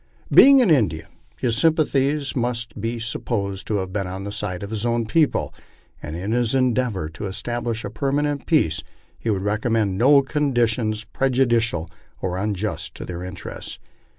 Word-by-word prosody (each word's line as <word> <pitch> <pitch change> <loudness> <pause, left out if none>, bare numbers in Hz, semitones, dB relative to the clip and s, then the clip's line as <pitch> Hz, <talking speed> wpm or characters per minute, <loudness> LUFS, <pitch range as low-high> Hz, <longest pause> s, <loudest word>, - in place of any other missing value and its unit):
Being 275 -1 +8
an 200 - +3
Indian, 100 - +2 0.3
his 115 - 0
sympathies 145 -1 +1
must 120 -4 -2
be 115 +2 -2
supposed 100 -4 -3
to 110 - 0
have 95 -2 -3
been 100 -3 -1
on 95 +1 -5
the 100 - -5
side 100 -3 -3
of 100 - -6
his 110 -1 -2
own 120 -1 0
people, 150 +7 +1 0.5
and 75 +2 -6
in 95 +5 -3
his 120 +1 +1
endeavor 125 -9 +1
to 80 +6 -6
establish 120 +3 -3
a 105 - -5
permanent 140 +2 -1
peace 80 - +2 0.4
he 115 - -3
would 95 -3 0
recommend 105 -1 0
no 140 +3 +6
conditions 120 -6 0
prejudicial 120 -10 +1 0.3
or 90 0 -2
unjust 105 +1 -3
to - - -6
their 90 -1 -6
interests. 90 0 -7
115 Hz, 160 wpm, -22 LUFS, 100-130 Hz, 0.5 s, Being